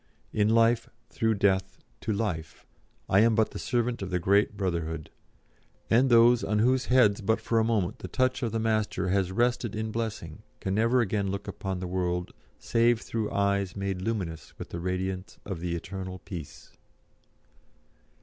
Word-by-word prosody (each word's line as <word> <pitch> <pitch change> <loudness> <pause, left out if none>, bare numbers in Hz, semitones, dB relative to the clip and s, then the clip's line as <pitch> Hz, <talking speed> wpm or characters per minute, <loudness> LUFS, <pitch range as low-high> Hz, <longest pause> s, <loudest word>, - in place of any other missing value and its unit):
In 105 0 +2
life, 115 +1 +3 0.2
through 110 -1 +1
death, 95 -1 +1 0.2
to 110 - -3
life, 90 -7 -3 0.4
I 95 - +4
am 115 +1 +5
but 110 -1 +2
the - - -6
servant 120 -1 -1
of 95 - -4
the 90 - 0
great 100 +4 +2
Brotherhood, 85 -5 -3 0.8
and 125 +4 +5
those 120 0 +6
on 105 - 0
whose 125 +4 +3
heads 115 -5 +4
but 110 +3 +1
for 115 +1 +1
a - - +3
moment 110 -6 0
the - - -6
touch 130 +7 0
of 115 -3 -1
the 115 - -1
Master 110 -4 0
has 95 -1 +1
rested 120 +1 0
in 110 0 -3
blessing 110 -9 -4 0.2
can 95 - -2
never 115 +4 +3
again 100 -2 0
look 100 +1 -4
upon 95 -2 -4
the - - -3
world 90 -1 -2 0.2
save 115 0 +2
through 110 -2 -3
eyes 100 -1 0
made 100 -2 -3
luminous 95 -6 -4
with - - -8
the 85 - -5
radiance 95 +2 -3
of 95 -5 -4
the 85 0 -2
Eternal 95 +1 -6
Peace. 80 -9 -9
100 Hz, 170 wpm, -28 LUFS, 95-115 Hz, 0.8 s, those